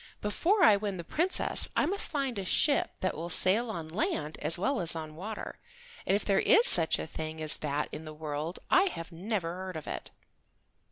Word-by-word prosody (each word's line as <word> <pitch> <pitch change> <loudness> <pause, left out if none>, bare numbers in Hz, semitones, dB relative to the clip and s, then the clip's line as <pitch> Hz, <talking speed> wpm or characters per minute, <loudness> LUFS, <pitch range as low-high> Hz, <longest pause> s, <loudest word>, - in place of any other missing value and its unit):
Before 350 - 0
I 210 -11 +6
win 200 -2 -4
the 170 - -7
Princess 340 - +3
I - - +2
must 400 +3 +2
find 270 -8 -3
a - - -4
ship 280 +9 +1
that 185 - -2
will 170 +2 -6
sail 205 +7 +2
on 170 -7 -6
land 155 -3 -3
as 155 +3 0
well 245 +6 -1
as 170 -1 +1
on 155 -1 -7
water, 210 +6 -7 0.5
and 195 - +2
if 205 - -3
there 195 -1 +2
is 455 +2 +5
such 165 -2 +7
a - - -5
thing 160 0 -7
as 155 -1 -1
that 150 0 -3
in 160 - -8
the 155 - -9
world 155 +2 -5
I 380 - +5
have 175 - -6
never 175 0 -4
heard 185 -1 -7
of 155 - -9
it." - - -6
185 Hz, 210 wpm, -29 LUFS, 160-220 Hz, 0.5 s, such